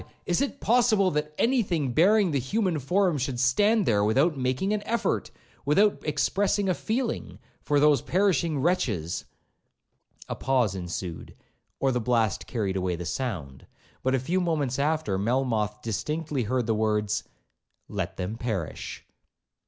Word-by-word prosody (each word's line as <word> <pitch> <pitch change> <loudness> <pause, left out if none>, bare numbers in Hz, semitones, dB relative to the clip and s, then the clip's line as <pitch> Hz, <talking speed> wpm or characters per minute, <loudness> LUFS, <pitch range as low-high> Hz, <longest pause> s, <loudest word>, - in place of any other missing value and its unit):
is 175 - +1
it 280 0 -2
possible 220 -5 +3
that 150 0 -2
any 255 +1 +3
thing 160 - -1
bearing 190 - +4
the 140 - +1
human 180 - 0
form 175 +3 +1
should 125 -1 -2
stand 205 - +3
there 105 -2 +3
without 135 +10 +3
making 130 +10 0
an 210 - -1
effort, 230 +1 -1 0.3
without 195 +9 +3
expressing 200 +5 +1
a 185 - +3
feeling, 230 +6 -3 0.2
for 145 -1 +1
those 145 -3 +4
perishing 175 -4 +1
wretches!' 120 - 0 1.0
A - - -3
pause 125 -6 +1
ensued, 90 -2 -6 0.4
or 135 - +2
the 125 -1 0
blast 115 -3 0
carried 100 -5 -2
away 90 -1 -1
the 90 +1 -6
sound; 85 - -4 0.3
but 130 +1 +1
a - - +1
few 175 +9 0
moments 150 -7 -1
after, 145 -10 0
Melmoth 110 -2 0
distinctly 140 +4 -2
heard 125 +2 0
the 115 - +1
words, 105 -1 0 0.6
'Let 95 -2 -4
them 95 +4 -4
perish.' 110 -9 -4
135 Hz, 145 wpm, -26 LUFS, 110-180 Hz, 1.0 s, bearing